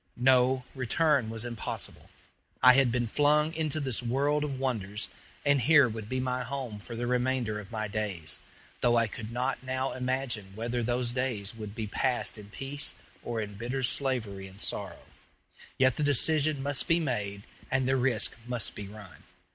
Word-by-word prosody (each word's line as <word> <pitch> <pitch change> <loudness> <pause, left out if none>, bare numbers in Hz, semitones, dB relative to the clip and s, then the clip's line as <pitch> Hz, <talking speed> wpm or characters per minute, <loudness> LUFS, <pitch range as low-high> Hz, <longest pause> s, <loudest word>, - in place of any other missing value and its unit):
No; 130 +1 +4
return 135 -1 +2
was 115 +1 -2
impossible. 120 -2 -5 0.5
I 125 - +10
had 130 -2 +5
been 120 0 +1
flung 150 +5 +3
into 155 -2 0
this 130 -6 -1
world 140 +5 +1
of 140 -3 -3
wonders, 105 -6 -1 0.4
and 145 -2 +4
here 145 +1 +6
would 110 -2 -6
be 130 - -1
my 125 0 -1
home 125 -4 -4
for 115 +3 -7
the 120 +1 -2
remainder 125 -3 0
of 105 0 -11
my 110 -2 -2
days; 100 -6 0 0.4
though 120 -1 +3
I 115 - +4
could 110 +1 -7
not 125 +3 -1
now 130 +1 -2
imagine 125 -6 -2
whether 120 +2 -2
those 120 +1 0
days 120 -5 -2
would 105 -2 -8
be 110 -2 -3
passed 120 +1 0
in 100 -1 -11
peace 135 +6 -1 0.3
or 115 -2 -3
in 105 -1 -5
bitter 125 +3 -2
slavery 120 -7 +1
and 95 +1 -14
sorrow. - - -3 0.7
Yet 130 -2 +4
the 150 - 0
decision 145 +1 +2
must 140 0 0
be 170 -1 +4
made 105 -9 -2 0.3
and 130 -1 +1
the 135 - +3
risk 125 -4 +1
must 120 -3 -2
be 100 - -7
run. 100 -2 -11
125 Hz, 175 wpm, -29 LUFS, 110-135 Hz, 0.7 s, I